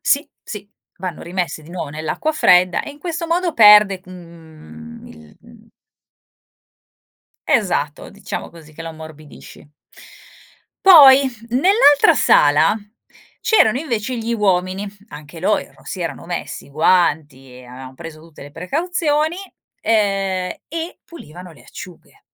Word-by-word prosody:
Sì, 285 +3 0
sì 205 -1 -9 0.3
vanno 180 -3 -6
rimessi 175 -2 -4
di 155 - -15
nuovo 175 -4 -6
nell'acqua 155 - -3
fredda 180 - +3
e - - -8
in 290 - -15
questo 335 +1 -5
modo 340 0 -1
perde, 210 -3 +6
mhmm, 160 - -14
il 80 -1 -16 2.1
Esatto - - -1
diciamo - - -7
così 160 -2 -16
che 165 - -10
lo 165 - -7
ammorbidisci. 155 -2 -14 1.2
Poi 280 -7 +8 0.2
nell'altra 305 - +4
sala 150 - +3 0.7
c'erano 260 - +3
invece 250 -4 -4
gli 230 +1 -3
uomini. 190 -1 -1 0.2
Anche 150 -1 -12
loro 210 +4 -1
si 185 - -7
erano 165 -1 -5
messi 175 -5 -6
i - - -19
guanti 150 -4 0
e 125 - -14
avevan 130 +1 -11
preso 160 +1 -11
tutte 165 -2 -15
le 145 - -12
precauzioni, 310 - -2 0.4
ehm, 195 -4 -1
e 330 +2 -6
pulivano 180 - -13
le 155 - -19
acciughe. 180 -2 -13
185 Hz, 125 wpm, -18 LUFS, 155-265 Hz, 2.1 s, Poi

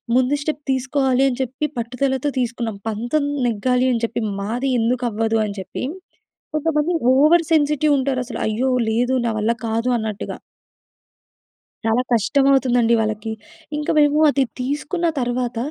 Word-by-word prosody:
ముందు 255 +2 +3
స్టెప్ 300 0 -3
తీసుకోవాలి 265 0 +1
అని 250 -2 -1
చెప్పి 265 +3 -2
పట్టుదలతో 260 +4 -1
తీసుకున్నాం. 235 -3 -2
పంతం 240 +7 -1 0.2
నెగ్గాలి 250 +3 +1
అని 230 - -1
చెప్పి. 235 +1 -3 0.2
మాది 235 +7 -2
ఎందుకు 245 +2 0
అవ్వదు 225 +1 0
అని 200 -1 -5
చెప్పి. 190 - -6 0.7
కొంతమంది 310 +1 +1 0.2
ఓవర్ 310 +5 +5
సెన్సిటివ్ 300 -1 +3
ఉంటారు 265 -1 0
అసలు - - -6
అయ్యో 230 +5 0 0.2
లేదు, 245 +3 +1
నా - - +1
వల్ల 215 +2 +1 0.2
కాదు 230 +2 -1
అన్నట్టుగా! 215 -2 -4 1.5
చాలా 225 +2 +2
కష్టమవుతుందండి 245 0 +3
వాళ్ళకి. 215 0 -2 0.5
ఇంకా 300 - -1
మేము 295 0 +4
అది 280 -1 +2 0.2
తీసుకున్న 295 +7 -1
తర్వాత 245 -1 -2
250 Hz, 135 wpm, -21 LUFS, 230-280 Hz, 1.5 s, ఓవర్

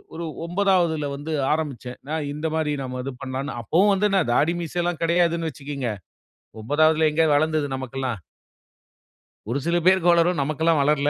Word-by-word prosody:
ஒரு 170 - -4 0.2
9ஆவதில 175 -5 +1
வந்து 150 +3 -5 0.2
ஆரம்பிச்சேன். 135 -6 -4
நான் 155 -2 -2
இந்த 155 +2 -3
மாரி 155 -2 0
நம்ம 125 -1 -5
இது 135 - -4
பண்ணலாம்னு 135 0 -4
அப்பவும் 185 - +3
வந்து 205 +2 +2
என்ன 195 -2 +3
தாடி 160 +7 +2
மீசைலாம் 175 0 -2
கிடையாதுன்னு 170 -1 +1
வச்சிக்கோங்க. 140 -4 -4 0.7
9ஆவதில 155 +5 +3
எங்க 160 +1 +3
வளர்ந்தது 155 0 +1
நமக்கெல்லாம்? 130 -5 -4 1.3
ஒரு 135 +4 0
சில 170 +1 +2
பேருக்கு 185 -2 +5
வளரும். 170 0 +2
நமக்கெல்லாம் 155 +2 +1
வளரல. 145 0 +2
155 Hz, 145 wpm, -23 LUFS, 140-170 Hz, 1.3 s, பேருக்கு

